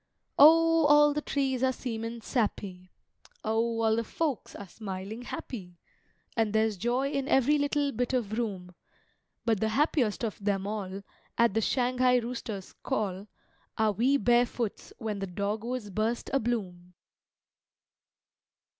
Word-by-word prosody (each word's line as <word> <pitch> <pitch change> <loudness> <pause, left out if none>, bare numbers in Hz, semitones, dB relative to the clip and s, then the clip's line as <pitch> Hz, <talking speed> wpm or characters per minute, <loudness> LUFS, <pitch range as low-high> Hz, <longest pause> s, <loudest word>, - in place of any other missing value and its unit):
O, 330 +1 +7
all 295 0 +6
the 300 - -1
trees 270 -4 -1
are 260 0 +3
seemin' 230 -2 -5
sappy! 200 -6 -2 0.5
O, 225 +1 0
all 220 0 +3
the 230 - 0
folks 290 0 -3
are 200 - -8
smilin' 200 +4 -7
happy! 180 -10 -7 0.6
And 220 -2 +1
there's 220 -1 +2
joy 245 +8 0
in 275 -1 -2
every 280 +3 +3
little 285 0 +1
bit 245 0 -1
of 225 -5 -1
room; 195 -6 -4 0.7
But 225 -4 +2
the 220 - +1
happiest 250 -3 +1
of 210 -2 -6
them 195 -1 0
all 200 -2 -4 0.3
At 235 -4 +4
the 225 - +1
Shanghai 250 +1 +2
rooster's 230 -5 -5
call 195 -1 -2 0.5
Are 220 -1 +3
we 250 +7 +2
barefoots 240 -3 0
when 215 -3 -4
the 195 - -3
dogwoods 210 +4 -3
burst 220 +4 -1
abloom! 195 -9 -2
230 Hz, 135 wpm, -29 LUFS, 205-255 Hz, 0.7 s, O